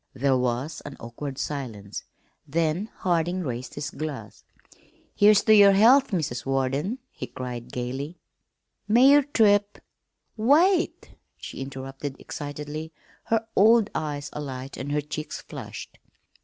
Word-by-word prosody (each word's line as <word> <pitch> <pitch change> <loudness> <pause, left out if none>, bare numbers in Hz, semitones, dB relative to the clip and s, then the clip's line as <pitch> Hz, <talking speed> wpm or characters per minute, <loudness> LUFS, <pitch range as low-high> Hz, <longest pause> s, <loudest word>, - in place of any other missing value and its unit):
There 135 +1 +2
was 125 +4 -1
an 145 - -9
awkward 130 +4 -7
silence, 115 -10 -5 0.4
then 165 +7 0
Harding 175 0 +1
raised 125 -5 -5
his 145 0 -4
glass. 140 -8 -7 0.7
"Here's 205 0 +5
to 220 - +5
your 200 -2 +8
health, 250 +7 +6
Mrs. 145 - -2
Warden!" 135 - -1
he - - -7
cried 125 -2 -7
gayly. 135 +7 -4 0.7
"May 245 +6 +6
your 290 +1 +7
trip 205 -7 +2 0.3
" - - -50 0.2
"Wait!" 360 +2 +2 0.3
she - - -8
interrupted 135 +1 -6
excitedly, 150 +2 -6 0.3
her 225 0 +1
old 220 +1 +5
eyes 145 -2 -3
alight 135 -2 -6
and 140 +2 -5
her 150 0 +1
cheeks 150 +1 -6
flushed. - - -9
150 Hz, 130 wpm, -25 LUFS, 135-205 Hz, 0.7 s, your